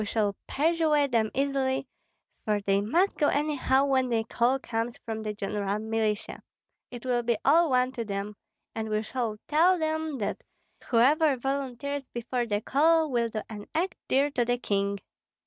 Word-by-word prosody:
We -, -, -2 dB
shall 205 Hz, -1 st, 0 dB
persuade 305 Hz, -2 st, +2 dB
them 225 Hz, -2 st, +2 dB
easily, 270 Hz, -1 st, 0 dB, 0.6 s
for 210 Hz, -1 st, +1 dB
they 200 Hz, 0 st, +1 dB
must 340 Hz, -, +2 dB
go 295 Hz, -, +4 dB
anyhow 285 Hz, -2 st, +2 dB
when 260 Hz, -2 st, +2 dB
the 225 Hz, -2 st, +1 dB
call 240 Hz, +3 st, +1 dB
comes 235 Hz, -2 st, -3 dB
for 220 Hz, -1 st, -5 dB
the 215 Hz, -1 st, -3 dB
general 200 Hz, 0 st, -2 dB
militia, 220 Hz, -1 st, -2 dB, 0.5 s
it 245 Hz, 0 st, -9 dB
will 245 Hz, -1 st, +1 dB
be 235 Hz, -1 st, 0 dB
all 325 Hz, +4 st, +5 dB
one 255 Hz, 0 st, +2 dB
to 240 Hz, -3 st, -4 dB
them 205 Hz, 0 st, -4 dB, 0.4 s
and 220 Hz, -1 st, -4 dB
we 215 Hz, 0 st, 0 dB
shall 230 Hz, -2 st, -3 dB
tell 345 Hz, +5 st, +4 dB
them 315 Hz, -2 st, -2 dB
that 210 Hz, -, -3 dB, 0.5 s
whoever 275 Hz, +4 st, +4 dB
volunteers 270 Hz, +1 st, -3 dB
before 240 Hz, +1 st, -3 dB
the 205 Hz, -1 st, -1 dB
call 315 Hz, +5 st, +3 dB
will 235 Hz, -2 st, +1 dB
do 215 Hz, -1 st, -4 dB
an 210 Hz, -2 st, -9 dB
act 355 Hz, +4 st, 0 dB
dear 280 Hz, +2 st, +2 dB
to 250 Hz, -3 st, +1 dB
the 245 Hz, +1 st, 0 dB
king. 200 Hz, -3 st, -1 dB
245 Hz, 170 wpm, -28 LUFS, 220-280 Hz, 0.6 s, all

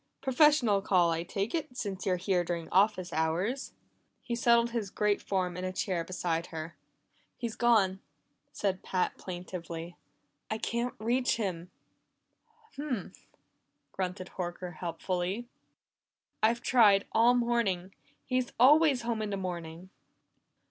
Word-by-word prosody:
"Professional 265 Hz, -6 st, +4 dB
call, 180 Hz, -4 st, +3 dB
I 165 Hz, 0 st, -1 dB
take 195 Hz, +5 st, -3 dB
it, 290 Hz, -7 st, -3 dB
since 195 Hz, -4 st, -4 dB
you're 185 Hz, -, +3 dB
here 180 Hz, 0 st, +1 dB
during 170 Hz, -1 st, -3 dB
office 185 Hz, -2 st, +2 dB
hours." 175 Hz, -, -1 dB, 0.5 s
He 240 Hz, -, -4 dB
settled 235 Hz, 0 st, +3 dB
his 225 Hz, -4 st, -2 dB
great 210 Hz, +1 st, +1 dB
form 185 Hz, -3 st, -1 dB
in 180 Hz, -, -5 dB
a 185 Hz, -, -2 dB
chair 185 Hz, -2 st, -1 dB
beside 170 Hz, -2 st, -2 dB
her. 160 Hz, 0 st, -7 dB, 0.6 s
"He's 235 Hz, -2 st, -4 dB
gone!" 210 Hz, -6 st, +3 dB, 0.5 s
said 190 Hz, -2 st, -1 dB
Pat 185 Hz, -1 st, -1 dB
plaintively. 175 Hz, -2 st, -6 dB, 0.5 s
"I 220 Hz, -, -1 dB
can't 235 Hz, +2 st, -2 dB
reach 245 Hz, +4 st, +1 dB
him." 180 Hz, -6 st, -3 dB, 1.1 s
"Humph!" 270 Hz, -9 st, -5 dB, 0.6 s
grunted 185 Hz, 0 st, -4 dB
Horker 175 Hz, -1 st, -5 dB
helpfully. 180 Hz, +6 st, -3 dB, 0.9 s
"I've 230 Hz, +2 st, +3 dB
tried 210 Hz, -5 st, +5 dB
all 235 Hz, +2 st, +5 dB
morning 230 Hz, -7 st, 0 dB, 0.3 s
he's 255 Hz, -1 st, -1 dB
always 285 Hz, 0 st, +6 dB
home 230 Hz, -2 st, -1 dB
in 215 Hz, -, -2 dB
the 200 Hz, -, -2 dB
morning." 175 Hz, -1 st, -6 dB
195 Hz, 130 wpm, -30 LUFS, 180-235 Hz, 1.1 s, always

